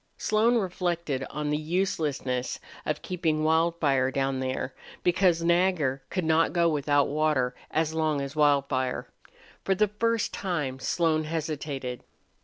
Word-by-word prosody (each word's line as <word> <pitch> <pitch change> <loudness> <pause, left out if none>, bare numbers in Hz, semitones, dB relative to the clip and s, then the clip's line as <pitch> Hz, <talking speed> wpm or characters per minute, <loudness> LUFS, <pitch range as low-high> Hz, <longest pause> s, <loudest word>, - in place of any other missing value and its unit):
Slone 220 +3 +2
reflected 175 - -2
on 150 0 -3
the 150 - +1
uselessness 155 -7 -1 0.3
of 150 - -2
keeping 160 -4 -1
Wildfire 160 -5 +2
down 135 0 -1
there, 130 0 -3 0.3
because 175 -2 +3
Nagger 170 -6 +2
could 185 -3 -2
not 160 +1 +3
go 170 -1 +3
without 145 -2 +2
water 145 -4 +1 0.2
as 160 0 0
long 155 -2 +1
as 140 +1 -5
Wildfire. 140 -3 +1 0.6
For 195 - +1
the 210 +1 +2
first 230 +2 0
time 150 -9 -2
Slone 155 +2 +1
hesitated. 150 -5 -4
155 Hz, 130 wpm, -27 LUFS, 140-175 Hz, 0.6 s, because